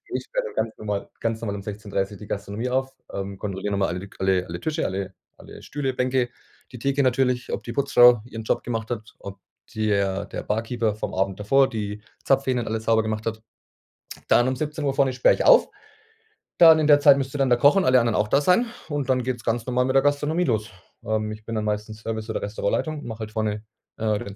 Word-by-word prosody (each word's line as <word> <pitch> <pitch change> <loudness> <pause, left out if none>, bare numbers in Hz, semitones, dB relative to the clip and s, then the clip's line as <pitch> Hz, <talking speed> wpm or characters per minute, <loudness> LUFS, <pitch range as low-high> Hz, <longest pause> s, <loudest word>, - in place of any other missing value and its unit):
Ich - - -2
sperre - - -2
dann - - -11
ganz 110 - -14
normal 105 -2 -4
ganz 115 0 -2
normal 100 -3 -3
um 100 - -6
16:30 100 -1 -4
die 105 - -11
Gastronomie 105 +4 -4
auf, 130 +1 -1 0.2
ähm, 100 0 -5
kontrolliere 100 0 -4
noch 100 - 0
mal 95 - +2
alle 90 +1 -3
lik 100 +1 -11
alle 95 -1 +1
alle 85 0 -6
Tische, 160 - -2
alle 95 0 -3 0.2
alle - - -13
Stühle, 135 -2 -3
Bänke, 125 -1 0 0.4
die - - -7
Theke 140 +3 +1
natürlich, 125 -1 +1
ob - - -3
die 120 - -6
Putzfrau 125 -4 +5
ihren 115 -2 -8
Job - - -1
gemacht 115 -1 -4
hat, 110 -2 -6
ob 100 0 -9 0.3
di 110 -1 -1
er 100 0 0
der - - -6
Barkeeper 110 0 -1
vom 110 - -5
Abend 95 +1 -1
davor 135 +6 +3
die 105 -1 -5 0.2
Zapfhähne 130 -2 +2
und 115 - -6
alles 110 0 -3
sauber 115 0 +3
gemacht 110 0 -3
hat. 110 -1 -3 0.9
Dann 120 +1 +4
um 130 - -1
17:00 150 -1 -2
vorne 135 -1 +2
sperre 125 0 +3
ich - - -2
auf. - - +6 0.9
Dann 160 -2 +8
in 150 - +2
der 145 -1 +7
Zeit 145 -1 +7
müsste 135 +1 -3
dann 135 -1 +2
der 120 - +4
Koch 145 +9 +5
und 190 - +3
alle 130 -3 +5
anderen 115 -2 0
auch 105 - +1
da 140 +6 +3
sein 180 +10 +3 0.2
und 145 -3 -3
dann 130 -1 +2
geht's 120 -2 -4
ganz 115 0 -1
normal 125 0 +1
mit 130 +1 -1
der 135 - +5
Gastronomie 145 +4 +1
los. 110 -8 -1 0.4
Ähm, 110 0 -1
ich 110 0 -10
bin 115 - -5
dann 110 - -1
meistens 105 +1 -3
Service 110 0 -5
oder - - -2
Restaurantleitung 130 +9 -2
und - - -10
mache 115 -1 -7
halt 110 -1 -6
vorne, 110 -1 -2 0.3
äh, 110 -2 0
den 100 -1 -8
115 Hz, 230 wpm, -24 LUFS, 105-135 Hz, 0.9 s, Dann